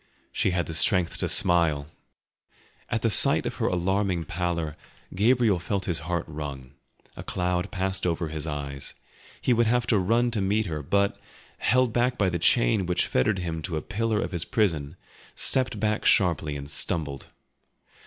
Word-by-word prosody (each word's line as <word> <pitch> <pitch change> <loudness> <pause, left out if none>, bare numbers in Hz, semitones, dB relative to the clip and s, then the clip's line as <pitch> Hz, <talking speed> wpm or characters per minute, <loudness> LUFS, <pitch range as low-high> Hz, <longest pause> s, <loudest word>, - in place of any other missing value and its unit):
She - - +1
had 90 -1 0
the 80 - -6
strength 90 +2 +2
to - - 0
smile! 80 -5 +3 1.0
At - - -1
the - - +3
sight - - +5
of - - -4
her - - 0
alarming 90 -1 0
pallor 85 -2 -2 0.4
Gabriel 110 -1 +3
felt 95 +2 -2
his 85 -3 -2
heart 85 0 -2
wrung, 70 -4 -7 0.4
a - - -7
cloud 90 +1 -2
passed 95 0 -1
over 85 -1 -1
his 80 0 -5
eyes; 70 -2 -5 0.4
he 125 - +2
would 120 -1 +2
have 120 +1 +2
run 115 +4 +2
to 110 -3 -1
meet 105 +3 +1
her, 80 -4 -4
but, 100 +7 0 0.4
held 125 -2 +2
back 125 +1 +1
by 100 -3 +2
the 85 -1 -2
chain 85 - +3
which 90 - +1
fettered 95 +11 +1
him 85 -3 -3
to 80 -1 -3
a - - -2
pillar 110 0 -1
of - - -3
his 85 -3 -1
prison, 80 -10 0 0.4
stepped 130 -4 0
back 105 0 0
sharply 80 -6 +2
and 70 0 -6
stumbled. 70 -1 -3
90 Hz, 170 wpm, -26 LUFS, 80-105 Hz, 1.0 s, sight